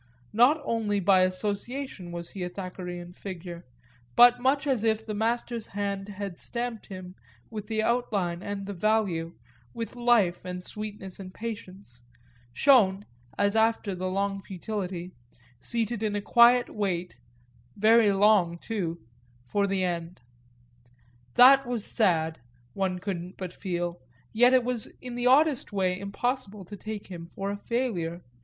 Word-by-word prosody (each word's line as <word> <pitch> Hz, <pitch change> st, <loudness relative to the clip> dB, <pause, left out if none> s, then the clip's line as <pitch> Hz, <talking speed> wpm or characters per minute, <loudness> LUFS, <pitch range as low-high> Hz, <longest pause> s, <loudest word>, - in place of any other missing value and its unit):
Not 250 Hz, +8 st, +5 dB
only 220 Hz, -5 st, 0 dB
by 190 Hz, 0 st, +5 dB
association 200 Hz, +2 st, -2 dB
was 170 Hz, 0 st, -6 dB
he 195 Hz, -, -7 dB
a 180 Hz, -, -2 dB
Thackerayan 180 Hz, -1 st, -7 dB
figure, 175 Hz, -2 st, -8 dB, 0.5 s
but 245 Hz, 0 st, +8 dB
much 270 Hz, +3 st, +2 dB
as 260 Hz, -6 st, +1 dB
if 220 Hz, -1 st, +1 dB
the 215 Hz, -, -4 dB
master's 230 Hz, +1 st, -1 dB
hand 200 Hz, 0 st, -3 dB
had 200 Hz, -3 st, -6 dB
stamped 235 Hz, -2 st, -4 dB
him 185 Hz, -2 st, -8 dB, 0.4 s
with 210 Hz, -2 st, -6 dB
the 220 Hz, 0 st, 0 dB
outline 200 Hz, -8 st, 0 dB
and 200 Hz, 0 st, -4 dB
the 200 Hz, -, -5 dB
value, 185 Hz, -4 st, 0 dB, 0.4 s
with 230 Hz, +1 st, -5 dB
life 240 Hz, -7 st, +3 dB
and 180 Hz, 0 st, -6 dB
sweetness 210 Hz, -2 st, -7 dB
and 185 Hz, -1 st, -8 dB
patience 190 Hz, -, -8 dB, 0.5 s
shown, 205 Hz, -, +4 dB, 0.3 s
as 200 Hz, +1 st, +2 dB
after 220 Hz, -2 st, +2 dB
the 185 Hz, 0 st, -3 dB
long 195 Hz, +1 st, -1 dB
futility, 185 Hz, -2 st, -5 dB, 0.5 s
seated 230 Hz, -, -2 dB
in 215 Hz, -2 st, -1 dB
a -, -, 0 dB
quiet 240 Hz, +3 st, +6 dB
wait, 180 Hz, -6 st, -2 dB, 0.6 s
very 220 Hz, 0 st, +5 dB
long 195 Hz, -4 st, +4 dB
too, 170 Hz, -, -4 dB, 0.4 s
for 200 Hz, +10 st, 0 dB
the 195 Hz, -1 st, 0 dB
end. 175 Hz, -1 st, -3 dB, 1.2 s
That 270 Hz, +1 st, +8 dB
was 240 Hz, -4 st, -2 dB
sad, 165 Hz, -7 st, +1 dB, 0.3 s
one 190 Hz, -2 st, -1 dB
couldn't 180 Hz, -1 st, -5 dB
but 185 Hz, -2 st, -6 dB
feel; 175 Hz, -3 st, -3 dB, 0.3 s
yet 245 Hz, +3 st, +6 dB
it 255 Hz, -1 st, +5 dB
was 245 Hz, -2 st, -2 dB
in 250 Hz, -1 st, -7 dB
the 245 Hz, +1 st, 0 dB
oddest 290 Hz, +1 st, +4 dB
way 185 Hz, -2 st, 0 dB
impossible 205 Hz, 0 st, -3 dB
to 205 Hz, -, -9 dB
take 215 Hz, 0 st, -6 dB
him 170 Hz, -3 st, -8 dB
for 195 Hz, +3 st, -4 dB
a 205 Hz, -, -4 dB
failure. 185 Hz, -9 st, -1 dB
200 Hz, 145 wpm, -27 LUFS, 180-230 Hz, 1.2 s, but